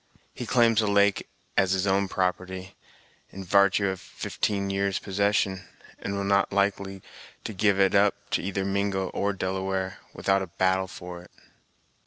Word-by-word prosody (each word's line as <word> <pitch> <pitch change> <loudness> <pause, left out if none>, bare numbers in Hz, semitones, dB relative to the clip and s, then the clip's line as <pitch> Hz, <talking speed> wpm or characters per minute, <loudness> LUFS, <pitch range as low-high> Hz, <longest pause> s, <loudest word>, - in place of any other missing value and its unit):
He - - -6
claims 115 -2 +4
the 110 - +2
lake 100 0 +2 0.3
as 95 -1 +3
his 95 0 +1
own 100 0 +2
property, 95 0 -2 0.5
in 95 - -8
vartue 100 +1 +4
of 95 - -7
fifteen 100 -1 -2
years' 100 0 0
possession, 95 -1 0 0.3
and 100 - -4
will 100 - -2
not 100 0 +2
be - - -7
likely 100 -1 0 0.4
to 110 - -5
give 100 0 +2
it 95 -1 +4
up 100 0 +4 0.2
to - - +1
either 95 +1 -2
Mingo 100 -1 0
or 100 - -1
Delaware 95 0 -2 0.2
without 95 0 +1
a 95 - -4
battle 95 +2 +1
for 90 -1 -9
it!" 90 - -17
95 Hz, 165 wpm, -26 LUFS, 95-100 Hz, 0.5 s, claims